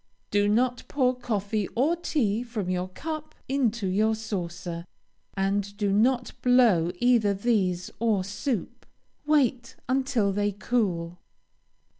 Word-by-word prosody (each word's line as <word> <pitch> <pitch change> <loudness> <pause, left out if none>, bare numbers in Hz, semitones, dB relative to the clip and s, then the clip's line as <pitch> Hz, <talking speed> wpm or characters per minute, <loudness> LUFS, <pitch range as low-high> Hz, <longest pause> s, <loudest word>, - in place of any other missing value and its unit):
Do 205 0 +3
not 245 +3 +1
pour 255 -3 +1
coffee 210 -4 -2
or 285 +8 +3
tea 240 -11 0
from 225 -7 -3
your 180 0 -1
cup 310 - -6
into 235 -6 0
your 215 +4 +2
saucer, 180 -5 -5 0.5
and 200 +1 -1
do 205 -2 +1
not 245 +4 +2
blow 235 -10 +4
either 220 -1 +3
these 190 -5 0
or 215 -4 +2
soup. 205 +3 -4 0.4
Wait 260 -5 +2
until 255 -5 +1
they 205 0 0
cool. 180 -6 -1
215 Hz, 120 wpm, -27 LUFS, 195-250 Hz, 0.5 s, blow